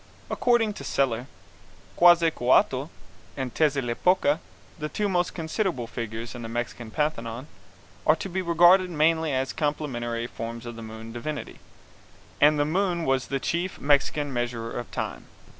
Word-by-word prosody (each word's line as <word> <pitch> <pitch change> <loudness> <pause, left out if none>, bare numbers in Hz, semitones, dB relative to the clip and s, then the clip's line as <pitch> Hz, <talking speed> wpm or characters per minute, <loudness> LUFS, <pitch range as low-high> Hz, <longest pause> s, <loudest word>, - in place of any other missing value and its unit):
According 235 -3 +2
to 140 - -9
Seler, 130 -3 0 0.7
Quetzalcouatl 160 -5 +4 0.5
and 130 -3 -3
Tezeatlipoca, 145 +2 +2 0.4
the 150 0 -3
two 210 +5 -1
most 180 -2 0
considerable 165 - -1
figures 115 0 -5
in 120 - -7
the 115 - -6
Mexican 120 0 -4
pantheon, 115 -2 -2 0.6
are 155 - +7
to 165 - -5
be 190 0 -2
regarded 175 +2 +5
mainly 160 -1 +2
as 130 0 -1
complementary 120 -6 -2
forms 115 0 -6
of 120 -1 -6
the 115 - -8
moon 110 0 -8
divinity, 150 +5 -5 0.8
and 150 +1 +6
the 145 - +2
moon 175 +1 0
was 135 -1 +1
the 135 - -1
chief 175 +6 -2
Mexican 145 0 +2
measurer 120 -2 -2
of 120 - -5
time. - - -5
145 Hz, 140 wpm, -26 LUFS, 120-165 Hz, 0.8 s, are